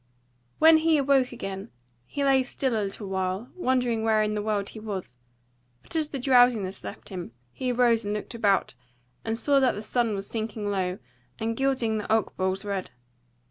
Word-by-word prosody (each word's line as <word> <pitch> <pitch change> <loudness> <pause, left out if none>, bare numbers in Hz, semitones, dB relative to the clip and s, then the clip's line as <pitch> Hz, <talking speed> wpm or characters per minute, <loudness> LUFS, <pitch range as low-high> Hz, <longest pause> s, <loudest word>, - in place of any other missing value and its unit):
When 320 0 +7
he 320 0 +3
awoke 275 -2 +3
again 195 -2 -6 0.4
he 285 - -3
lay 270 -1 +4
still 260 0 -2
a 215 - +1
little 200 +1 -5
while, 190 +4 -2
wondering 250 -8 +1
where 220 -1 +3
in 210 0 -1
the 210 - -1
world 205 -2 -1
he 220 - -9
was, 195 - -6 0.7
but - - -6
as 310 -2 +1
the 280 - -4
drowsiness 245 -7 +3
left - - -8
him, 180 - -7 0.2
he 255 -1 -2
arose 240 -2 +3
and 205 0 -2
looked 210 - -5
about, 205 - +1 0.5
and 225 0 -2
saw 280 +3 +3
that 260 -2 +3
the 210 - -6
sun 230 -1 0
was 195 0 -4
sinking 215 -2 -3
low 185 -2 -1 0.4
and 225 0 -2
gilding 250 -4 +1
the 210 - -5
oakboles 190 -2 0
red. 195 -2 -3
220 Hz, 180 wpm, -26 LUFS, 200-255 Hz, 0.7 s, When